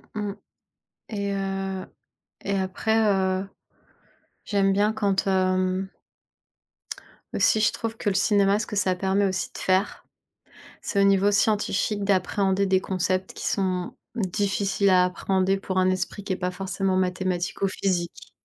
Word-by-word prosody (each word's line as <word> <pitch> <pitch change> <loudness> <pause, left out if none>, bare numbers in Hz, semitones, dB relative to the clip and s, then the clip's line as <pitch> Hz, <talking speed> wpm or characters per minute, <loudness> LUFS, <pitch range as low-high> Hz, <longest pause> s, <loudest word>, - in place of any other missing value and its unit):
Mmh 210 -1 -2
mh - - -10 0.8
et 200 -2 -2
heu 195 -1 -3 0.6
et 200 0 -1
après, 190 +4 0
heu, 190 -1 +1 1.0
j'aime 195 -1 +2
bien 205 +2 +2
quand, 200 -3 0
hem 185 0 +1 1.4
aussi 220 - +3
je 215 - +3
trouve 225 0 -5
que - - -1
le 195 - -2
cinéma, 200 0 +3
ce 215 - -3
que - - -5
ça 190 -2 +2
permet 195 +2 +1
aussi 190 -1 -2
de - - -8
faire, 190 +2 0 0.8
c'est 200 - 0
au - - +5
niveau 195 0 +4
scientifique, 205 0 +1
d'appréhender 195 0 +1
des 190 -1 +3
concepts 185 0 -1
qui - - -6
sont 185 -2 -1 0.2
difficiles 200 -1 0
à 180 -1 +5
appréhender 190 +1 0
pour 190 -1 -3
un 185 0 +3
esprit 185 +2 -3
qui 195 - -2
est - - -5
pas 180 -1 -2
forcément 190 +1 -2
mathématique 185 -1 -1
ou 195 - +3
physique 180 -3 -2
195 Hz, 150 wpm, -25 LUFS, 185-200 Hz, 1.4 s, au